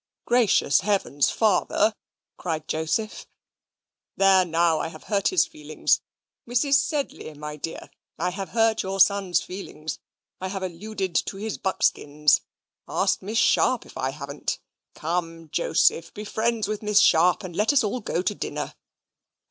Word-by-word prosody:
"Gracious 235 - +3
heavens! 190 -8 +1
Father," 215 0 +2 0.4
cried 160 -3 -4
Joseph. 160 +8 -2 0.9
"There 195 -1 +5
now, 165 -2 +2
I - - -2
have 165 - -11
hurt 200 -2 0
his 180 -1 +3
feelings. 150 0 0 0.5
Mrs. 250 +4 +1
Sedley, 285 - 0
my 150 +1 -6
dear, 160 +2 -7 0.3
I 180 +2 -1
have 195 +1 -5
hurt 225 -1 +2
your 195 +1 -4
son's 190 -3 +4
feelings. 160 -5 -7 0.4
I 185 - -3
have 190 0 -4
alluded 190 +1 -4
to 195 - -5
his 215 +2 -4
buckskins. 150 -5 +2 0.5
Ask - - +1
Miss 215 +4 -3
Sharp 255 0 +3
if - - -15
I 130 - -1
haven't? 140 +1 -4 0.4
Come, 165 0 -3
Joseph, 165 0 +2
be 210 - -6
friends 220 0 0
with 210 0 -3
Miss 210 -1 +3
Sharp, 175 +1 +4
and 180 -3 -7
let 210 +7 +3
us 285 -4 +3
all 215 +4 -1
go 180 -5 -2
to 190 - 0
dinner." - - -4
190 Hz, 150 wpm, -25 LUFS, 165-215 Hz, 0.9 s, There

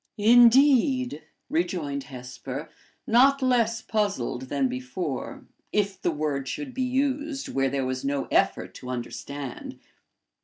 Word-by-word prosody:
"Indeed!" 245 - +5 0.3
rejoined 160 -5 -2
Hesper, 130 +3 -7 0.3
not 270 +4 +4
less 235 -2 +2
puzzled 165 - -2
than 140 -2 +1
before, 125 +3 -5 0.3
if 200 -2 0
the - - +1
word 150 -4 -2
should 275 - -5
be 260 - -3
used 275 +3 -1
where 135 0 +1
there 135 0 -1
was 130 0 -3
no 140 0 -1
effort - - +1
to 125 - -9
understand. 130 +2 -6
170 Hz, 120 wpm, -26 LUFS, -, 0.3 s, Indeed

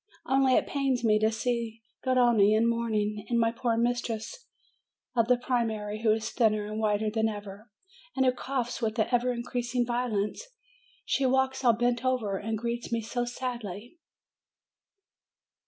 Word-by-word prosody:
Only 265 -1 +3
it - - +3
pains 270 -3 -1
me 215 -2 +4
to 220 +1 +2
see 230 0 -2 0.2
Garrone 240 -5 +4
in 225 +2 +3
mourning, 215 -3 -1
and 235 -1 +2
my 230 0 +3
poor 230 0 -1
mistress 240 - -2 0.7
of 230 -2 +3
the 250 0 +4
primary, 220 -4 -2
who 225 -2 +3
is 220 +1 -1
thinner 215 -3 +2
and 215 +1 -4
whiter 215 0 +1
than 220 0 +1
ever, 205 +1 -8 0.5
and 265 - +2
who 255 - +5
coughs 250 -1 -3
with 225 0 -1
an 220 - +1
ever 245 0 +2
increasing 245 0 -2
violence. 235 - -1 0.6
She 275 - 0
\valks 265 0 +1
all 240 -2 +6
bent 240 +1 0
over 230 -7 0
now, 210 - -8
and 220 - 0
greets 235 +2 -4
me 230 0 0
so 240 +2 -2
sadly 240 - -6
235 Hz, 160 wpm, -28 LUFS, 220-250 Hz, 0.7 s, all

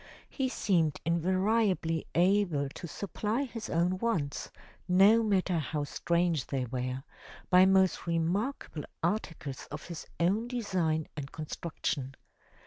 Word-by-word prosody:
He 265 -2 -1
seemed 165 - +1
invariably 185 0 +1
able 175 -5 +3
to 170 - -8
supply 210 - -2
his 230 -4 -6
own 175 +3 +1
wants, 175 - -1 0.4
no 195 +5 +6
matter 190 -5 +1
how 150 0 -2
strange 170 -1 0
they 135 -2 -1
were, 125 +1 -3 0.5
by 185 +1 +7
most 190 -2 +3
remarkable 170 - -1 0.2
articles 165 -8 -2
of 150 +1 -7
his 170 -2 -7
own 200 +7 +2
design 180 -10 0
and 140 -2 -6
construction. 150 -4 -4
175 Hz, 120 wpm, -30 LUFS, 155-200 Hz, 0.5 s, by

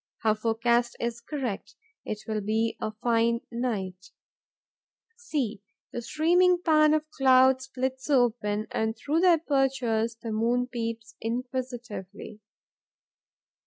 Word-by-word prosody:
Her 220 -1 +4
forecast 235 +2 +1
is 235 0 -3
correct: 245 -6 -5 0.3
it 210 0 -5
will 215 -1 -1
be 220 +2 0
a 215 - -2
fine 230 +1 +1
night. 195 -6 -3 1.1
See, 280 - -3 0.3
the 240 - -3
steaming 350 +7 +3
pan 305 -2 +5
of 310 - 0
the - - -38 0.2
clouds 260 0 +5
splits 260 +1 -4
open; 225 -5 +2
and, 220 0 -1
through 290 +8 0
the 360 0 +6
apertures, 260 -6 0
the 230 0 -6
moon 235 +3 +1
peeps, 230 -2 -5
inquisitively. 240 -4 -5
235 Hz, 120 wpm, -27 LUFS, 220-265 Hz, 1.1 s, the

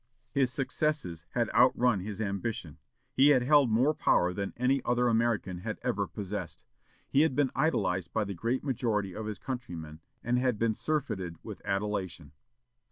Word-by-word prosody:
"His 135 -2 +2
successes 130 - -2
had 120 -3 0
outrun 125 -3 +4
his 100 +2 -6
ambition. 100 -5 -3 0.3
He 135 +2 +5
had 135 -4 +5
held 145 -1 +5
more 125 +8 +3
power 90 -10 +2
than 100 +1 -3
any 130 +2 +2
other 120 0 +2
American 115 -6 +1
had - - -4
ever - - 0
possessed. 100 -2 -6 0.4
He 140 - +3
had 155 -4 +2
been 145 -3 +2
idolized 95 - 0
by 110 - +1
the 100 -1 -4
great 115 +8 -1
majority 110 -7 -1
of 110 -1 -5
his 105 - -4
countrymen, 85 - -6 0.2
and 120 +1 +1
had 125 -3 +1
been 115 0 +1
surfeited 110 - -2
with - - -8
adulation." 95 -6 -2
115 Hz, 165 wpm, -30 LUFS, 95-130 Hz, 0.4 s, He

